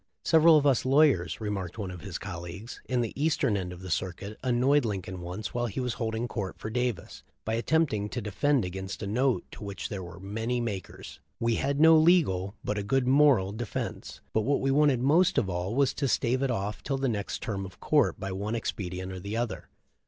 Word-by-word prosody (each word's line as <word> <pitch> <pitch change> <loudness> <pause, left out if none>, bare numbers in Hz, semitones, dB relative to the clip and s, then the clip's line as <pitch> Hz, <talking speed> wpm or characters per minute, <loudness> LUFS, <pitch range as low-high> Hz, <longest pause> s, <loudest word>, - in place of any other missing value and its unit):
"Several 160 0 +6
of 145 - +1
us 135 -4 +3
lawyers," 135 - +3
remarked 100 -5 -4
one 100 -4 -4
of 90 - -9
his 95 -4 -5
col 90 -4 -6
leagues, 90 +7 -8
"in 125 -1 0
the 115 - -3
eastern 145 -7 +1
end 90 -2 -3
of 90 0 -9
the 95 - -6
circuit 95 +4 -3
annoyed 130 +3 +3
Lincoln 95 -4 -4
once 90 +4 -5
while 120 0 0
he 110 - -4
was 125 -2 -1
holding 115 0 -2
court 100 -6 -4
for 110 - -6
Davis 120 -6 -2 0.2
by 110 - -1
attempting 115 -4 +1
to - - -3
defend 120 +4 +1
against 95 +2 -5
a - - -2
note 125 +5 +1
to - - -10
which 100 -1 -5
there 100 -3 -4
were 90 0 -9
many 110 +5 -2
makers. 105 -6 -6 0.2
We 115 -1 +1
had 140 +1 0
no 160 +1 +8
legal, 155 - +3
but 105 0 -1
a - - -3
good 130 +4 +1
moral 130 -7 +4
defense, 110 +1 -5
but 110 - +2
what 140 +6 +1
we 135 - +1
wanted 140 -3 +3
most 165 +7 +4
of 95 - +1
all 90 +5 -2
was 140 0 +3
to 140 - -1
stave 125 0 +1
it 135 - +1
off 105 -3 -2
till 135 -1 -2
the 135 0 0
next 105 -5 -3
term 100 -3 -3
of 95 -1 -10
court - - +2
by 95 - -4
one 100 +4 -3
expedient 95 -4 -4
or 95 -1 -7
another. 115 +3 -3
110 Hz, 215 wpm, -28 LUFS, 95-135 Hz, 0.2 s, no